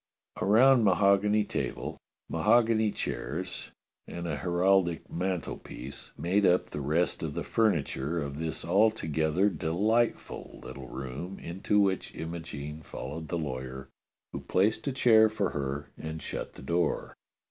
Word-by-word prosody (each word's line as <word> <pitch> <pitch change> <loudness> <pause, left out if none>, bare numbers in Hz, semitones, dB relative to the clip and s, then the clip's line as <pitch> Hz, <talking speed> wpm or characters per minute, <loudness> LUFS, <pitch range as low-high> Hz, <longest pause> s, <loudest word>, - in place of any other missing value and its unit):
A - - -1
round 125 +4 +6
mahogany 100 +2 +4
table, - - -4 0.3
mahogany 110 +5 +3
chairs, 90 -1 -4 0.4
and 85 0 -5
a - - -1
heraldic 90 -1 +2
mantelpiece 85 -6 -4
made 95 +4 +1
up 90 -1 +3
the 75 - -4
rest 80 +5 +1
of - - -4
the - - -2
furniture 85 -7 0
of 70 -1 -4
this 80 -1 -3
altogether 90 -3 +2
delightful 105 +6 0
little 65 -2 -8
room 70 +10 -6
into 95 +4 0
which 95 -2 +1
Imogene 80 -2 -6
followed 80 +2 -7
the 85 - -2
lawyer, 65 -3 -5 0.4
who - - -3
placed 105 +8 +1
a - - +2
chair 110 -4 +6
for 100 -3 -1
her 70 0 -4
and 80 0 -6
shut - - -5
the - - -12
door. 85 +5 0
85 Hz, 135 wpm, -29 LUFS, 75-100 Hz, 0.4 s, round